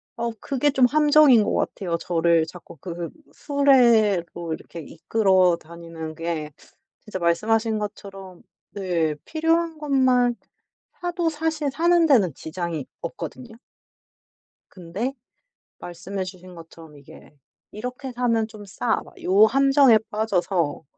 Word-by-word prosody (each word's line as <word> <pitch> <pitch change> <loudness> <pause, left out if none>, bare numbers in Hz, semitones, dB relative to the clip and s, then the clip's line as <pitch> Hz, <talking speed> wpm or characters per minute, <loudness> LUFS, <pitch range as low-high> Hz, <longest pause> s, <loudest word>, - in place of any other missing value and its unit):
어 235 0 -2
그게 280 +1 0
좀 265 -2 +4
함정인 295 -4 +5
것 - - -1
같아요. 175 -4 -2
저를 170 -1 +1
자꾸 175 -2 -13
그 170 +2 -6 0.2
수레로 220 - +2
이렇게 170 - -9
이끌어 185 +2 +1
다니는 165 -1 -9
게 165 -2 -4 0.5
진짜 210 -4 -7
말씀하신 215 +6 +1
것처럼 195 -3 -8 0.3
네 170 -6 -1
필요한 325 0 0
것만 260 -4 +2 0.7
사도 350 -1 -1
사실 315 -1 -2
사는 340 +3 +3
데는 205 - +3
지장이 160 -2 -5
없거든요. 245 - -8 1.1
근데 190 +9 -5 0.7
말씀해 185 +3 -6
주신 185 -1 -11
것처럼 165 -2 -14
이게 140 - -16 0.4
'이렇게 250 +4 -6
사면 230 -3 0
좀 215 -2 -12
싸.' 220 +4 -1
막 - - -18
요 195 +4 +5
함정에 270 0 +5
빠져서 185 -7 -1
210 Hz, 245 characters per minute, -23 LUFS, 170-260 Hz, 1.1 s, 함정인